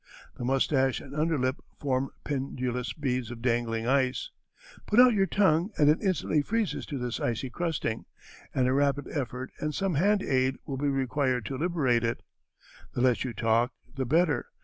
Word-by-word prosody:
The - - -5
mustache 135 0 +2
and 140 - -11
under 160 +1 +1
lip 130 0 0 0.2
form 135 -1 0
pendulous 130 -3 -2
beads 125 -5 -2
of 120 -1 -8
dangling 115 -2 0
ice. 130 0 +1 0.6
Put 215 - +3
out 250 -1 +8
your 195 -2 +2
tongue 180 -1 +3
and 150 0 +6
it 155 - 0
instantly 185 -6 +1
freezes 220 +6 -1
to 145 - -4
this 125 -2 -3
icy 120 +2 -2
crusting, 160 -8 -2 0.5
and 130 -1 +1
a 130 - +2
rapid 140 0 +1
effort 130 -2 -4
and 150 -1 -2
some 195 -2 0
hand 200 +6 +3
aid 130 0 +1
will 135 -4 -4
be 145 +1 0
required 130 -3 0
to 135 - -4
liberate 140 -7 +1
it. 115 0 -2 0.7
The 120 - 0
less 125 -2 +3
you 125 - -4
talk 115 +3 +1 0.2
the 135 -2 -2
better. 150 -1 +2
135 Hz, 175 wpm, -28 LUFS, 125-155 Hz, 0.7 s, out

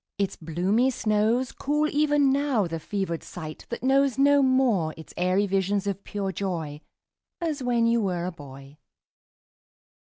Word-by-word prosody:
Its 200 -1 -1
bloomy 185 +10 +1
snows 225 +1 +1
Cool 300 +2 0
even 290 -2 +3
now 275 -6 +1
the 165 -1 -4
fevered 185 -1 -3
sight 155 -3 -9
that 235 - -5
knows 270 0 +3
No 285 +1 +5
more 255 -12 +2
its 160 - -12
airy 185 +3 +1
visions 195 +1 0
of 200 -1 -3
pure 200 -2 -3
joy 165 -6 -4 0.6
As 315 -4 -2
when 240 -2 +1
you 230 0 +3
were 180 -4 -1
a 180 - -3
boy. 140 -2 -13
205 Hz, 150 wpm, -26 LUFS, 175-260 Hz, 0.6 s, No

